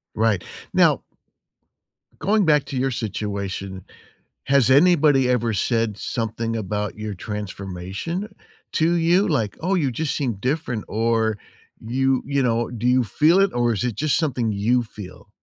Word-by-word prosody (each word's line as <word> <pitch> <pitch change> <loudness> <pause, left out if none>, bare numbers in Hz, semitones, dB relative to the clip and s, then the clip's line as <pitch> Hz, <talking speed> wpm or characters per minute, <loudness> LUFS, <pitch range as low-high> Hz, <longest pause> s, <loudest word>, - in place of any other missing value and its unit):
Right. 110 -4 +1 0.3
Now - - +4 1.2
going 210 +1 +2
back 150 -4 +3
to 140 - -5
your 135 +1 +1
situation, 100 -4 -4 0.6
has 140 -3 +3
anybody 145 -3 +5
ever 120 -2 +1
said 115 0 0
something 115 0 -3
about 105 0 -3
your 105 -1 -4
transformation 100 - -5 0.4
to 165 +2 +2
you? 175 +4 +3
Like, 115 - -1
"Oh, 185 +4 +1
you 150 -7 +1
just 150 +5 -2
seem 130 -6 -1
different," 125 +1 -2
or 110 0 +1 0.4
you 130 +3 0
you 140 -1 0
know, 115 -1 +1
do 120 0 -3
you 125 0 +4
feel 155 - +3
it, 195 0 +3
or 120 -1 +1
is 110 - -2
it 120 -4 -2
just 150 -1 +1
something 125 -8 0
you 115 +5 +1
feel? 105 -4 -11
120 Hz, 150 wpm, -22 LUFS, 105-145 Hz, 1.2 s, anybody